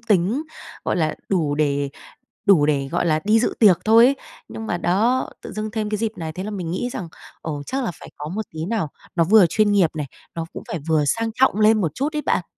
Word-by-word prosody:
tính, 220 - +1 0.4
gọi - - 0
là, 155 -2 0
đủ 160 -7 +1
để 145 -2 0 0.6
đủ 170 -7 +6
để, 140 -2 0
gọi - - 0
là, 155 -1 +2
đi 220 +2 +4
dự - - 0
tiệc 200 -6 +6
thôi 225 +2 +7
ấy. 275 - +2 0.3
Nhưng 225 - -7
mà 175 - -1
đó, 225 +10 +1
tự - - -8
dưng 215 0 -4
thêm 215 -1 -3
cái 210 - -1
dịp 225 0 -1
này, 160 -1 -5
thế 185 +4 -6
là 210 - -4
mình 180 -5 -4
nghĩ 215 +8 -2
rằng, 175 -5 -5 0.3
ồ, 145 -3 -4
chắc 265 -1 -2
là - - -1
phải - - -10
có 150 +1 -6
một 210 +6 -3
tí 160 0 -3
nào, 200 -4 -1 0.3
nó 165 - +4
vừa 205 +1 +6
chuyên 210 +4 +2
nghiệp 190 -6 +4
này, 150 -2 -2 0.3
nó 165 -1 -3
cũng - - -7
phải 170 - -3
vừa 155 -2 +3
sang 225 +10 0
trọng 255 -4 +3
lên 215 0 +5
một 160 -5 -1
chút 290 +4 -2
ấy 300 - -1
bạn. 180 - 0
195 Hz, 250 wpm, -22 LUFS, 160-220 Hz, 0.6 s, thôi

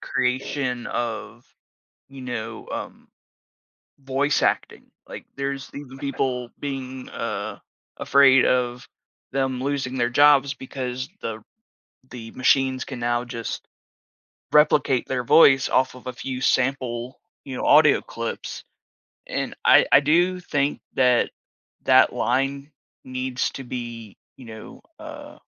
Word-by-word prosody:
creation 125 0 -2
of, 120 +1 -4 0.7
you 135 -1 -11
know, 115 -3 -6
um, - - -7 0.9
voice 135 +2 0
acting, - - 0 0.3
like, - - -9
there's 140 0 -4
even 135 -2 -9
people 130 -3 -2
being, 130 -2 -6
uh, 105 -2 -4 0.4
afraid 135 -2 +5
of 125 -1 0 0.4
them 130 -1 -1
losing 135 -2 -2
their 120 -1 +1
jobs 140 +1 +5
because 130 0 -5
the 110 -1 -5 0.7
the 115 -2 -8
machines 130 0 +2
can 130 -4 -7
now 120 0 0
just 115 -1 -6 0.9
replicate 150 -4 +4
their 130 -2 -2
voice 135 0 +6
off 130 -1 +1
of 125 - -14
a 125 - -3
few 130 +1 -5
sample, 125 -1 -1 0.2
you 135 - -7
know, - - -3
audio - - +6
clips, - - -6 0.6
and - - -3
I - - +7
I 140 - +8
do 175 +5 +2
think 145 -5 -1
that 125 -2 +3 0.5
that - - +5
line 135 +3 -1 0.3
needs 130 0 -2
to 135 - -8
be, 120 -4 -7 0.2
you 130 - -13
know, 110 -1 -11 0.2
uh, - - -10
130 Hz, 120 wpm, -23 LUFS, 120-135 Hz, 0.9 s, I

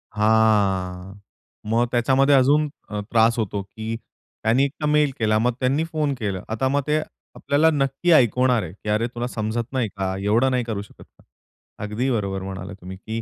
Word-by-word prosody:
हां. 100 -4 +2 0.6
मग 115 +2 +2
त्याच्यामध्ये 135 +3 +3
अजून 145 +3 +3 0.2
अ, 105 -1 -4
त्रास 115 0 +4
होतो, 100 -2 -2
की 110 +3 -6 0.5
त्यांनी 120 +5 +3
एकदा 150 +2 -5
मेल 150 -2 +3
केला, 110 -1 +2
मग 120 +1 +1
त्यांनी 135 +5 +1
फोन 155 -3 -1
केला 100 -4 -3
आता 115 +4 0
मग 140 +1 +1
ते, 155 +1 +2 0.4
आपल्याला 150 +3 +2
नक्की 140 +4 0
ऐकवणार 125 - +4
आहे. 80 - -7
की 105 +1 -8
"अरे! 110 +3 +1
तुला 120 0 -4
समजत 115 0 -3
नाही 125 -4 0
का? 95 -1 -2
एवढं 115 +6 +2
नाही 125 -1 +1
करू 110 -3 -4
शकत 100 - -14
का?" - - -27 0.6
अगदी 110 +6 -2
बरोबर 100 -4 -2
म्हणाला 95 0 -6
तुम्ही, 95 +1 -8
की 110 +4 -5
115 Hz, 175 wpm, -23 LUFS, 105-135 Hz, 0.6 s, त्रास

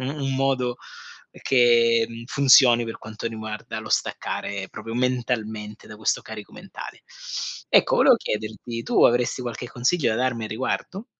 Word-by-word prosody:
u 140 +2 -4
un 135 0 -1
modo, 130 -2 0 0.7
che 120 -3 +4
mhmm, 115 0 -9
funzioni 130 -4 +6
per 115 - -6
quanto 110 +1 -7
riguarda 110 -1 -6
lo - - -9
staccare 100 -1 -2
proprio 115 +1 -7
mentalmente, 115 -4 -2
da 110 - -10
questo 110 - 0
carico 105 -2 -9
mentale. - - -10 0.7
Ecco, - - +4
volevo - - +6
chiederti, 110 +2 -5
tu - - +2
avresti 125 +1 +2
qualche 120 0 -5
consiglio 125 +3 +1
da 110 - 0
darmi 120 -3 -1
a - - -3
riguardo? 175 - -3
115 Hz, 150 wpm, -24 LUFS, 110-130 Hz, 0.7 s, funzioni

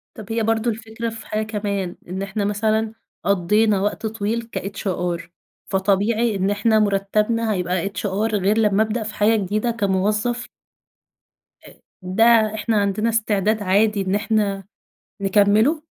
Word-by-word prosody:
طَب 215 0 -9
هي 225 0 0
برضه 225 +1 +1
الفكرة 225 +1 -5
في 225 0 -9
حاجة 215 0 -1
كمان، 200 -4 -3
إن 190 +1 -4
إحنا 200 +1 -2
مثلًا 215 +1 0 0.3
قضّينا 200 +2 +2
وقت 205 +2 -2
طويل 225 +2 -3
كhr 180 -3 -3 0.5
فطبيعي 205 +4 +1
إن 195 +1 0
إحنا 215 +2 +2
مرتّبنا 210 +2 +1
هيبقى 180 +1 -1
hr 210 +2 -2
غير 205 +2 +1
لمّا 210 -1 +3
ابدأ 220 +1 -2
في 215 - -5
حاجة 215 +2 +3
جديدة 215 +3 0
كموظف 210 +3 0 1.2
آآ - - -13 0.3
ده 220 +3 +4
إحنا 220 0 0
عندنا 200 +3 0
استعداد 215 -1 +1
عادي 200 +2 +2
إن 190 +1 0
إحنا 205 -2 0 0.6
نكمّله؟ 210 +10 +3
210 Hz, 135 wpm, -21 LUFS, 195-220 Hz, 1.2 s, ده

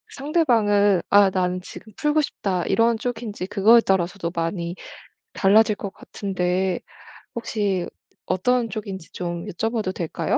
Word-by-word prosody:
상대방은 220 - +2
아 205 -1 +6
'나는 185 -1 -1
지금 215 +3 -11
풀고 300 0 +2
싶다' 190 - -2
이런 230 0 +3
쪽인지 225 -5 -4
그거에 215 +4 +5
따라서도 185 -3 0
많이 170 +1 -3 0.6
달라질 210 +1 +4
것 200 -1 -6
같은데 185 -2 -2 0.6
혹시 205 -6 -1 0.4
어떤 230 +6 +1
쪽인지 195 -5 -6
좀 170 -1 -4
여쭤봐도 220 0 -2
될까요? 170 -4 -1
200 Hz, 285 characters per minute, -23 LUFS, 180-225 Hz, 0.6 s, 아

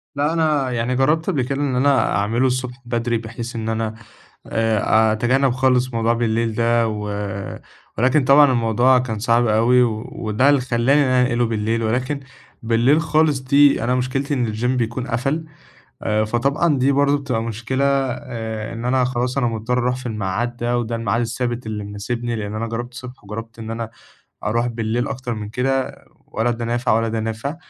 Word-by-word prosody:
لا، 145 +3 +1
أنا 150 -5 +1
يعني 120 +1 -1
جرَّبت 150 +5 +2
قبل 135 - +1
كده 135 +3 -2
إن 135 -3 0
أنا 135 +1 +2
أعملُه 115 +6 +1
الصبح 125 0 -3
بدري 120 -1 -1
بحيث 115 +1 -7
إن 110 -1 -3
أنا 110 0 -2 0.5
آآ، 110 0 +2
أتجنَّب 130 +4 +2
خالص 130 -1 +1
موضوع 115 0 +1
بالليل 115 -1 0
ده، 115 0 +2
و 105 -1 -4 0.9
ولكن 130 +4 +3
طبعًا 140 0 +6
الموضوع 120 +2 +3
كان 110 -4 -3
صعب 120 +1 +2
أوي، 120 +3 +4
وده 120 +2 0
اللي 140 -3 +4
خلَّاني 130 +3 +2
إن 140 - +2
أنا 130 0 +3
أنقلُه 120 -1 +1
بالليل، 115 +1 -1
ولكن 130 +6 -1 0.4
بالليل 120 +7 +3
خالص 155 -3 +2
دي 140 -1 +4
أنا 125 +2 +1
مشكلتي 135 +3 -1
إن 120 -5 0
الGym 115 +3 -3
بيكون 125 0 -1
قَفَل، 135 +7 -1 0.6
آآ، 110 0 +1
فطبعًا 140 +7 +1
دي 135 +2 +3
برضه 140 +1 +3
بتبقى 125 -5 -2
مشكلة 115 +4 -2
آآ، 125 -5 -2
إن 115 +1 -6
أنا 130 +1 +2
خلاص 125 +1 -1
أنا 120 - +2
مضطّر 115 +2 -1
أروح 125 0 0
في 130 0 -8
الميعاد 110 +3 -2
ده 120 +1 0
وده 115 -1 -2
الميعاد 115 +1 0
الثابت 120 0 -3
اللي 105 -2 -4
مناسبني، 115 +4 -4
لأن 105 -1 -4
أنا 110 +1 -2
جرَّبت 120 +2 -5
الصبح 125 -3 -10
وجرَّبت 115 +3 -8
إن 110 0 -7
أنا 115 -1 -4 0.5
أروح 115 +3 0
بالليل 115 0 -2
أكتر 125 -2 -4
من 105 -1 -6
كده، 135 +3 -1 0.3
ولا 115 +2 -1
ده 115 0 -3
نافع 120 0 0
ولا 115 +1 +2
ده 110 0 -2
نافع 115 +7 -4
120 Hz, 180 wpm, -21 LUFS, 115-130 Hz, 0.9 s, طبعًا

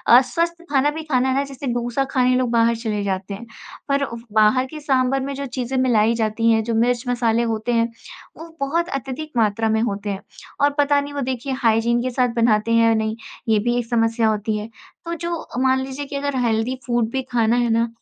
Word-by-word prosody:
अस्वस्थ 335 +7 +2
खाना 285 0 +3
भी 315 +1 -6
खाना 265 -4 +1
है 260 - +1
ना, 275 - +2
जैसे 275 0 -7
डोसा 240 +2 -1
खाने 255 -1 +3
लोग 250 -1 +1
बाहर 230 0 +3
चले 220 -3 -3
जाते 195 0 -3
हैं, 210 +4 -8 0.4
पर 280 0 +2
उव 235 -4 -5
बाहर 215 +4 +4
के 305 +4 -9
साँभर 270 -2 +1
में 275 +1 -3
जो 280 +1 -4
चीज़ें 255 0 -3
मिलाई 230 -3 +3
जाती 225 0 +1
हैं, 220 -1 +2
जो 230 +1 -2
मिर्च 240 +1 +2
मसाले 235 -2 +1
होते 220 +2 -2
हैं, 230 0 +1 0.5
वो 330 +1 -9
बहुत 330 +5 0
अत्यधिक 275 +2 -5
मात्रा 220 0 +2
में 220 0 +2
होते 205 -2 -2
हैं 195 -1 -3 0.4
और 285 - +5
पता 285 0 +4
नहीं 285 0 -7
वो 285 - -3
देखिए 260 +1 -3
हाइजीन 235 0 +2
के 255 - -1
साथ 250 0 +1
बनाते 230 -1 +2
हैं 230 0 +5
या 225 - +4
नहीं, 220 0 -1 0.3
ये 215 - +4
भी 240 +3 0
एक 245 - -1
समस्या 225 -1 +2
होती 215 0 -1
है। 210 +1 -6 0.4
तो 335 - -3
जो 340 -1 -3 0.2
मान 260 0 +3
लीजिए 270 +2 -5
कि 280 - -7
अगर 280 0 -2
हेल्दी 230 +1 0
फूड 240 -2 0
भी 265 - -1
खाना 230 -1 +2
है 240 -1 +1
ना, 230 +1 +2
240 Hz, 225 wpm, -21 LUFS, 225-270 Hz, 0.5 s, और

